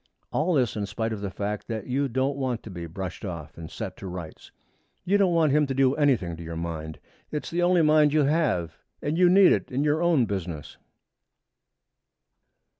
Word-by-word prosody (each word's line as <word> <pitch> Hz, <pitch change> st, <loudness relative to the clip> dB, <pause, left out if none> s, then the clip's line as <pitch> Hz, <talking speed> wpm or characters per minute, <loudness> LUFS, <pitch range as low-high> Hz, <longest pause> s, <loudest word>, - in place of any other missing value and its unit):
All 165 Hz, +3 st, +1 dB
this 125 Hz, -5 st, +1 dB
in 105 Hz, -2 st, -2 dB
spite 110 Hz, +2 st, -3 dB
of 105 Hz, -, -6 dB
the 100 Hz, -, -3 dB
fact 100 Hz, +2 st, -4 dB
that 110 Hz, -3 st, -4 dB
you 135 Hz, +2 st, 0 dB
don't 130 Hz, +2 st, 0 dB
want 130 Hz, -4 st, -2 dB
to 110 Hz, -, -9 dB
be 85 Hz, -2 st, -6 dB
brushed 90 Hz, +3 st, -6 dB
off 85 Hz, -6 st, -6 dB
and 80 Hz, -1 st, -9 dB
set 95 Hz, -5 st, -6 dB
to 95 Hz, -, -8 dB
rights. 90 Hz, -3 st, -8 dB, 0.5 s
You 200 Hz, +3 st, +3 dB
don't 185 Hz, -4 st, +3 dB
want 160 Hz, -3 st, +3 dB
him 150 Hz, 0 st, +3 dB
to 135 Hz, -, -3 dB
do 135 Hz, 0 st, +3 dB
anything 130 Hz, -, +1 dB
to 85 Hz, -, -8 dB
your 85 Hz, 0 st, -6 dB
mind. 80 Hz, -2 st, -5 dB, 0.3 s
It's 150 Hz, -, -4 dB
the 175 Hz, +1 st, 0 dB
only 175 Hz, -1 st, +4 dB
mind 150 Hz, -1 st, +5 dB
you 155 Hz, 0 st, +3 dB
have 135 Hz, -, 0 dB, 0.2 s
and 150 Hz, +2 st, -1 dB
you 180 Hz, +1 st, +5 dB
need 190 Hz, +1 st, +7 dB
it -, -, 0 dB
in 135 Hz, +3 st, 0 dB
your 150 Hz, +2 st, +1 dB
own 165 Hz, -8 st, +3 dB
business. 85 Hz, -8 st, -5 dB
125 Hz, 200 wpm, -26 LUFS, 90-150 Hz, 0.5 s, need